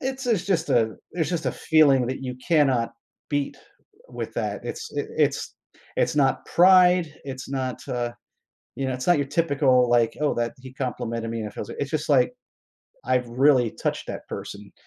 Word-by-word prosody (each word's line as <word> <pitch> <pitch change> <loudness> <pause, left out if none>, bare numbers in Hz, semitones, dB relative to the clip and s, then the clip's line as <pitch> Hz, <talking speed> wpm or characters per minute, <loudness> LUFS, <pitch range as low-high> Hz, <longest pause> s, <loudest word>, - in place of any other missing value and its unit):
It's 265 0 -4
a 240 - +3
it's 190 -5 0
just 175 -4 0
a 110 -2 +2 0.2
it's 165 -3 -1
just 170 -2 -2
a - - +1
feeling 145 -6 +4
that 130 +1 -4
you 125 -1 -5
cannot 135 -4 +2 0.4
beat 145 -1 -1 0.5
w - - -13
with - - -4
that, - - -3
it's 450 -1 -6
i - - +1
it's - - 0 0.4
it's - - +1
not - - +2
pride, 180 -1 +6 0.2
it's 130 -1 -7
not, 130 -2 -2
uh 120 -2 -2 0.6
you 135 0 -2
know, 130 - -1
it's 125 0 -5
not 175 - +5
your 140 -2 -1
typical, 140 -5 +3
like, 120 -1 +2
"Oh, 150 - +2
that 120 -1 -1
he 130 0 -11
complimented 115 -3 -3
me, 115 - -3
and 105 - -4
it 105 - -11
feels - - -6
like" - - -8
it's 140 0 -3
just, 155 0 -2
like, 125 -3 +3 0.7
I've 125 -1 +1
really 125 -1 +3
touched - - -3
that - - -6
person. 100 0 -8
135 Hz, 200 wpm, -24 LUFS, 125-160 Hz, 0.7 s, pride